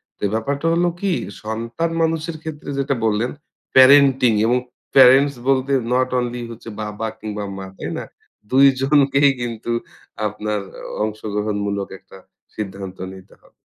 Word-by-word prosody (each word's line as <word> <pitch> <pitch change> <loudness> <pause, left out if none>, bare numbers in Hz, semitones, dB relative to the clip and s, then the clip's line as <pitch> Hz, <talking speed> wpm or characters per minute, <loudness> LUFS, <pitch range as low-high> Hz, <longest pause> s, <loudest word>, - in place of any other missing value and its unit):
তো - - -58
এই 100 - 0
ব্যাপারটা 140 +7 -2
হলো 175 +1 +2
কি 200 -2 +1 0.3
সন্তান 115 +9 -3
মানুষের 160 0 -1
ক্ষেত্রে 155 -2 -7
যেটা 140 0 0
বললেন 110 +3 +1 0.4
parenting 130 -3 +7
এবং 120 +2 +3 0.4
parents 135 +2 +7
বলতে 135 0 +2 0.2
নট 130 +1 +2
অনলি 120 0 -3
হচ্ছে 115 0 -10
বাবা 105 +1 -4
কিংবা 105 -1 -5
মা 95 - -6
তাই - - -5
না? - - -5 0.5
২ 135 +2 +6 0.2
জনকেই 140 0 +4
কিন্তু 120 -1 -4 0.6
আপনার 105 0 -3
আ - - -11 0.2
অংশগ্রহণমূলক 105 -2 -2
একটা - - -16 0.4
সিদ্ধান্ত 95 -2 -6 0.2
নিতে 95 -1 -14
হবে। - - -24
120 Hz, 140 wpm, -20 LUFS, 105-140 Hz, 0.6 s, parenting